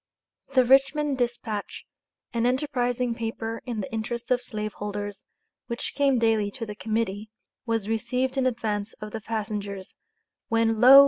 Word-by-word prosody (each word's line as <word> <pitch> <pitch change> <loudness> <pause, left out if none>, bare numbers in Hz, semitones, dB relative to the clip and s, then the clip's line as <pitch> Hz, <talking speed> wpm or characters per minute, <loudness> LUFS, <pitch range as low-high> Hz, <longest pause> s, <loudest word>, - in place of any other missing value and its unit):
The 255 -1 +7
Richmond 275 +2 +4
Dispatch, 240 -4 -2 0.5
an 235 0 +2
enterprising 250 -2 +1
paper 225 0 -3
in 230 -4 -2
the 195 - -6
interest 235 +2 -3
of 250 -1 +4
slaveholders, 205 -3 -4 0.4
which 235 0 -3
came 275 -2 +3
daily 225 -3 +3
to 230 - -3
the 210 - -5
Committee, 215 -1 -1 0.4
was 225 -3 0
received 250 +4 0
in 265 -1 +3
advance 215 -4 -1
of 215 0 -8
the 225 - -4
passengers, 205 -3 -3 0.6
when 225 -1 +3
lo! 265 +3 +11
230 Hz, 140 wpm, -27 LUFS, 215-250 Hz, 0.6 s, lo